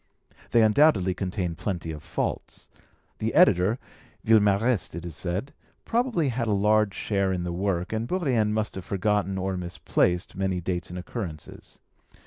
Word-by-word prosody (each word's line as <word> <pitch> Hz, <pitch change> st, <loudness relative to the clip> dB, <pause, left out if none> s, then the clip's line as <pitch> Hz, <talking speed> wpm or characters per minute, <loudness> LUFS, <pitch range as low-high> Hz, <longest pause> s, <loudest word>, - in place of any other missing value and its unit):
They 115 Hz, -, +4 dB
undoubtedly 110 Hz, -, +4 dB
contain 90 Hz, -2 st, -3 dB
plenty 85 Hz, -1 st, -4 dB
of 75 Hz, -2 st, -7 dB
faults. -, -, -4 dB, 0.5 s
The -, -, -2 dB
editor 95 Hz, +7 st, +5 dB, 0.5 s
(Villemarest, 105 Hz, -2 st, +3 dB
it 85 Hz, 0 st, -6 dB
is 85 Hz, -4 st, -6 dB
said) 95 Hz, -, -3 dB, 0.3 s
probably 230 Hz, -, +1 dB
had 120 Hz, -1 st, -2 dB
a 105 Hz, -, +2 dB
large 105 Hz, 0 st, +2 dB
share 100 Hz, -2 st, 0 dB
in 90 Hz, -2 st, -2 dB
the 90 Hz, -1 st, -3 dB
work, 90 Hz, 0 st, -1 dB
and 110 Hz, +1 st, -2 dB
Bourrienne 130 Hz, -, +1 dB
must 110 Hz, 0 st, -1 dB
have 95 Hz, -, -6 dB
forgotten 100 Hz, 0 st, 0 dB
or 95 Hz, 0 st, -2 dB
misplaced 90 Hz, +1 st, -1 dB
many 95 Hz, -1 st, -1 dB
dates 90 Hz, 0 st, -3 dB
and 90 Hz, -, -7 dB
occurrences. 90 Hz, -, -7 dB
100 Hz, 150 wpm, -26 LUFS, 90-110 Hz, 0.5 s, editor